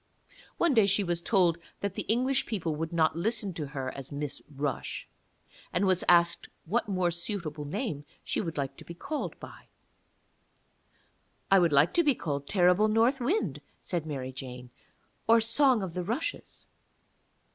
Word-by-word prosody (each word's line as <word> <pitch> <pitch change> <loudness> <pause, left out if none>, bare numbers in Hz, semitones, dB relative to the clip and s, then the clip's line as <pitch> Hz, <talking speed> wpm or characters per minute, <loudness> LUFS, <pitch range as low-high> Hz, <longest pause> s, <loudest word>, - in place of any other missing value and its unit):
One 340 -4 +3
day 220 -5 +5
she 205 +1 +3
was 175 -2 -1
told 175 -4 +3 0.2
that 200 -1 -2
the - - -3
English 255 +4 +2
people 170 -8 -2
would 160 +1 -3
not 160 -2 +2
listen 205 +2 -1
to 155 -3 -4
her 135 -2 -4
as 135 0 -7
Miss 145 0 -4
Rush, 140 -2 -4 0.6
and 180 +3 +1
was 185 -1 +2
asked 170 -1 +4 0.2
what 225 +7 0
more 185 -3 +1
suitable 170 -4 -4
name 155 - -3 0.2
she - - -1
would 165 -5 -5
like 135 -1 -2
to - - -11
be 170 - -9
called 300 - -4
by. - - -12 1.8
'I 195 - +8
would 170 -3 +3
like 145 +3 +4
to 345 - +4
be 290 -4 +3
called 140 -6 -3
Terrible 180 +2 +4
North 230 +5 +3
Wind,' 240 - 0 0.2
said 170 -3 -2
Mary 130 -3 -4
Jane, 125 -1 -8 0.6
'or 230 +1 +7
Song 230 0 +3
of 180 -3 -5
the 180 - -2
Rushes.' 235 - -4
175 Hz, 165 wpm, -29 LUFS, 150-220 Hz, 1.8 s, I